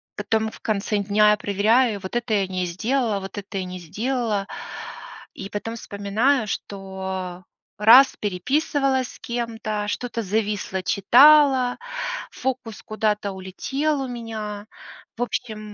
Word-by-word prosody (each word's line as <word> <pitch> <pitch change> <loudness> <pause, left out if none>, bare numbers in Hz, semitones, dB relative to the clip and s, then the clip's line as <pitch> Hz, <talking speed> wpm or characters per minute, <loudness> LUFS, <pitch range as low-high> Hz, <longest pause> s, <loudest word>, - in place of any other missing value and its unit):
потом 220 +1 0
в - - -13
конце 210 0 -1
дня 210 +1 +4
я 210 - +3
проверяю: 210 +3 +2
вот 190 +5 -7
это 235 -2 -1
я 195 -2 +2
не 185 -1 -2
сделала, 220 +4 0
вот 195 +2 -8
это 200 0 -6
я 190 - -1
не 180 0 -7
сделала. 215 +2 -2 0.9
И 195 - -7
потом 215 +3 -4
вспоминаю, 220 +4 0
что 190 -2 -5 0.3
раз 240 +6 +7
переписывалась 265 - 0
с - - -15
кем-то, 225 -3 -3
что-то 230 +1 -3
зависло, 205 -2 -1
читала, 260 +4 +6 0.5
фокус 255 -4 -4
куда-то 210 -2 -1
улетел 270 +11 -2
у 265 - -3
меня. 220 -3 -6 0.5
В 245 - 0
общем 215 -4 -5
215 Hz, 130 wpm, -23 LUFS, 200-245 Hz, 0.9 s, раз